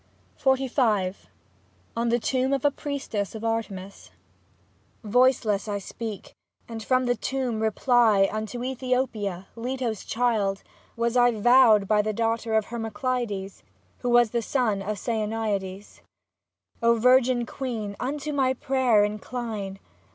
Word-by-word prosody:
49 265 -1 +1
XLV 205 -8 +2 0.8
ON 235 +1 0
THE 235 - +3
TOMB 260 +2 0
OF 275 - -4
A 290 - +5
PRIESTESS 270 -9 -4
OF 220 - -7
ARTEMIS 205 -4 -4 0.9
Voiceless 225 -2 +2
I 205 -1 -1
speak, 210 +1 -7 0.3
and 230 -1 -6
from 255 +2 +2
the 245 - +2
tomb 255 -2 -2
reply 220 -2 +3
Unto 215 +2 -4
^thopia, 250 -7 -2
Leto's 240 -2 -3
child, 220 -5 0 0.3
was 235 +1 -1
I 245 0 +5
Vowed 225 -2 +5
by 210 0 +3
the 215 +1 -2
daughter 225 0 -1
of 220 -1 +2
Hermo 230 -1 -4
cleides, 210 -4 -3 0.4
Who 245 - -2
was 240 -2 +4
the 235 - 0
son 225 -4 0
of 210 +1 -3
Saonaiades. 210 -3 -3 0.8
O 235 0 +4
virgin 250 0 +4
queen, 230 -6 -5
unto 290 +3 -3
my 260 -2 +2
prayer 255 -5 +2
incline. 210 -2 -4
230 Hz, 130 wpm, -25 LUFS, 210-255 Hz, 0.9 s, A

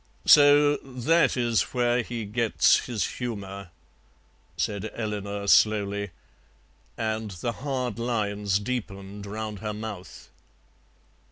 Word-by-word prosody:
"So 145 0 +7
that 135 +5 +1
is 120 -3 +2
where 120 0 +2
he 115 -1 -5
gets 110 +2 +2
his 115 -5 -1
humour," 100 -6 -6 0.9
said 105 +1 -2
Eleanor 100 -2 -4
slowly, 100 -1 +3 0.9
and 110 -1 -2
the 100 +5 -3
hard 125 -3 -3
lines 105 -4 0
deepened 100 -3 -5
round 105 0 -5
her 105 0 -4
mouth. 105 -4 -8
110 Hz, 100 wpm, -26 LUFS, 100-120 Hz, 0.9 s, So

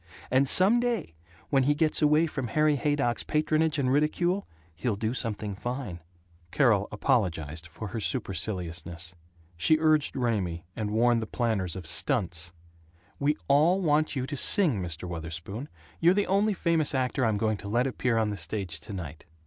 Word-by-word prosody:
And 130 +2 +4
some 205 +6 +5
day 235 - -1 0.4
when 135 -2 +4
he 145 +3 +2
gets 155 +1 +2
away 150 +2 +4
from 135 -6 -4
Harry 150 +4 +2
Haydock's 140 -3 0
patronage 155 0 +1
and 130 -2 +1
ridicule, 175 +6 +1 0.3
he'll 105 +6 -2
do 110 +3 -2
something 110 -4 -3
fine." 120 -3 -5 0.5
Carol 110 - +3
apologized 85 - -1
for 95 +6 -8
her 110 - -4
superciliousness. 90 - -3 0.4
She 155 - +4
urged 155 -2 +2
Raymie, 100 -10 -1
and 105 -2 -3
warned 115 +2 +3
the 110 - -4
planners 105 -9 -1
of 95 -3 -7
"stunts," 85 - -1 0.7
"We 150 +2 +1
all 155 +7 +4
want 155 -3 +1
you 130 -1 -1
to 145 +2 -5
sing, 145 - +3
Mr. 85 0 -4
Wutherspoon. 85 - -6 0.3
You're 175 +2 +4
the 205 - +2
only 200 +2 +2
famous 160 -4 +1
actor 130 +1 0
I'm 110 -3 +2
going 110 0 0
to 100 - -9
let 120 +5 +1
appear 125 -3 0
on 110 -2 +1
the 100 - -4
stage 85 -2 -4
tonight." 80 -4 -8
120 Hz, 165 wpm, -28 LUFS, 95-150 Hz, 0.7 s, some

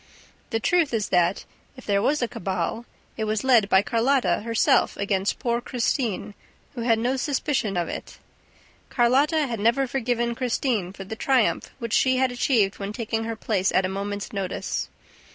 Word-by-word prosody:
The 225 - -1
truth 315 0 +2
is 215 -2 -1
that, 175 +1 +2 0.3
if 255 - -12
there 200 -1 +2
was 280 +4 +1
a - - +1
cabal, 190 +3 -3 0.3
it 220 - -1
was 215 -1 -1
led 240 -6 +4
by 190 0 +5
Carlotta 245 +5 +2
herself 230 +1 +2
against 200 -1 0
poor 235 0 -1
Christine, 235 -4 -2 0.4
who 245 - -5
had 230 -1 +3
no 245 +4 0
suspicion 265 - -1
of 170 -1 0
it. - - -7 0.7
Carlotta 280 +6 +3
had 235 -5 -4
never 235 +6 +2
forgiven 240 -2 -1
Christine 235 -5 -1
for 195 - -9
the 205 +3 -7
triumph 255 0 +1
which 230 -3 -5
she 260 -1 +3
had 260 -1 +2
achieved 235 -5 +1
when 200 0 -4
taking 225 -1 -2
her 225 0 -3
place 200 -3 0
at 185 - +2
a - - -1
moment's 200 +1 -4
notice. 195 -2 -3
230 Hz, 170 wpm, -24 LUFS, 200-255 Hz, 0.7 s, by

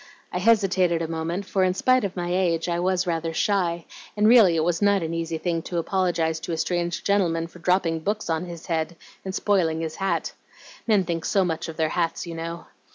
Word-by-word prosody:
I 180 - -1
hesitated 185 -5 +3
a - - -2
moment, 165 +4 -3
for 190 -1 0
in 185 0 +1
spite 255 +4 +3
of 195 -2 -3
my 175 -1 -2
age 170 -3 +1
I 170 0 0
was 185 +1 +1
rather 165 -1 -2
shy, 175 -5 0 0.3
and 210 +1 +4
really 220 -7 +7
it 160 - +1
was 170 +2 0
not 200 -3 +3
an 160 0 -3
easy 165 -1 -2
thing 165 0 -1
to 175 - -3
apologize 170 -2 0
to 170 - -6
a - - -2
strange 175 +1 -1
gentle 200 -3 +2
man 165 0 -2
for 170 +1 -13
dropping 170 -2 +1
books 210 +6 -2
on 165 +1 -1
his 170 -2 -9
head 165 0 -2 0.3
and 190 0 -5
spoiling 170 -6 +1
his 160 -1 -4
hat. 195 0 -1 0.5
Men 210 -4 +4
think 170 -2 -3
so 195 -2 +2
much 165 -1 -3
of 160 - -8
their 160 -1 +1
hats 170 0 -1
you 170 - -6
know. 165 +1 -6
175 Hz, 220 wpm, -24 LUFS, 165-190 Hz, 0.5 s, really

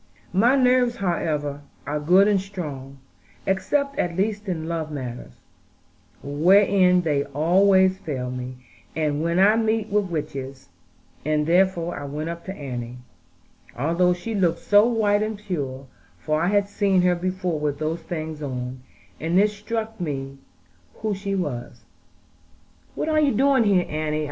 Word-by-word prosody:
My 235 +8 +4
nerves, 250 -2 +3
however, 150 -7 -2 0.2
are 145 +2 -2
good 180 +7 +5
and 205 -2 +2
strong, 145 -9 -7 0.5
except 280 +9 0
at 170 -1 -1
least 205 +1 -1
in 160 -3 -3
love 165 -2 -3
matters, 125 - -7 0.8
wherein 180 +5 +4
they 145 -4 +1
always 190 +5 +3
fail 130 -7 -4
me, 125 0 -6 0.4
and 150 -2 0
when 170 +1 0
I 205 +4 +5
meet 220 -1 0
with 205 0 +1
witches; 135 - -5 0.5
and 150 0 +1
therefore 175 0 +1
I 145 - -6
went 150 +4 -4
up 170 0 -9
to 190 - -6
Annie, 125 -5 -6 0.8
although 170 +7 +2
she 225 +6 -5
looked 180 -5 +1
so 205 +2 +5
white 210 -3 +2
and 215 0 -2
pure; 140 -10 -4 0.3
for 155 0 -1
I 170 - +1
had 200 +1 +2
seen 200 -2 +2
her 180 0 +4
before 180 -2 -2
with 145 -1 -1
those 155 +2 -2
things 155 -2 -5
on, 130 -2 -4 0.4
and 165 +4 +2
it 210 +1 +4
struck 220 0 -5
me 135 -4 -4 0.6
who 215 -1 0
she 195 0 -3
was. 145 -10 -4 1.1
"What - - -2
are 310 -1 +2
you 285 -6 +2
doing 265 -1 +4
here, 190 -4 +3
Annie?" 155 0 -2
175 Hz, 150 wpm, -23 LUFS, 150-200 Hz, 1.1 s, good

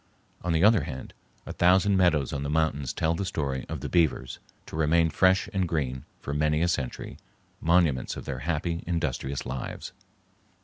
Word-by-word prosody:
On 90 - 0
the 80 +1 +2
other 110 -1 +5
hand, 65 -5 -7 0.3
a - - -6
thousand 95 +3 +4
meadows 85 -7 +2
on 70 - -2
the 70 - -3
mountains 75 -3 0
tell 80 +1 0
the 85 - -2
story 70 -7 -3
of - - -4
the - - -3
beavers, 80 -7 +1 0.3
to - - -9
remain 80 +1 +3
fresh 95 +5 +3
and 95 -2 +1
green 65 -6 -2
for 70 - -5
many 75 +2 +1
a - - +3
century, 65 -7 -3 0.4
monuments 80 -6 +2
of - - -7
their 65 -2 -4
happy, 85 +3 -2
industrious 75 -5 -2
lives. 65 0 -5
80 Hz, 175 wpm, -27 LUFS, 70-85 Hz, 0.4 s, other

